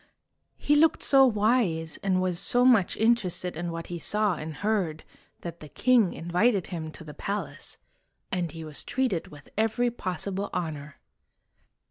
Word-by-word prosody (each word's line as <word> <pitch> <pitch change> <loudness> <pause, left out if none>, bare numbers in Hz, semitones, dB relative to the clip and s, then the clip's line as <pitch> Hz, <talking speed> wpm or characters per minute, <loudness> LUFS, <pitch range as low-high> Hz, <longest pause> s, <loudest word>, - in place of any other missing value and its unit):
He 295 - +2
looked 315 +1 +3
so 270 -1 +6
wise, 210 -8 +1
and 190 -2 0
was 180 -2 0
so 245 +1 +3
much 230 -8 +4
interested 205 -6 +1
in 170 +1 -4
what 165 0 -5
he 175 -1 -6
saw 210 +2 +2
and 155 -1 -6
heard, 185 -4 -1 0.4
that 170 -1 -7
the 150 - -11
king 235 - +3
invited 180 +4 +1
him 160 -2 -4
to - - -11
the 150 -2 -10
palace, 200 +6 -5 0.5
and 175 -4 -1
he 165 0 -8
was 150 -2 -6
treated 250 -11 -1
with 145 -1 -14
every 225 +3 +1
possible 195 -1 -3
honor. 155 -4 -4
185 Hz, 155 wpm, -27 LUFS, 165-220 Hz, 0.5 s, so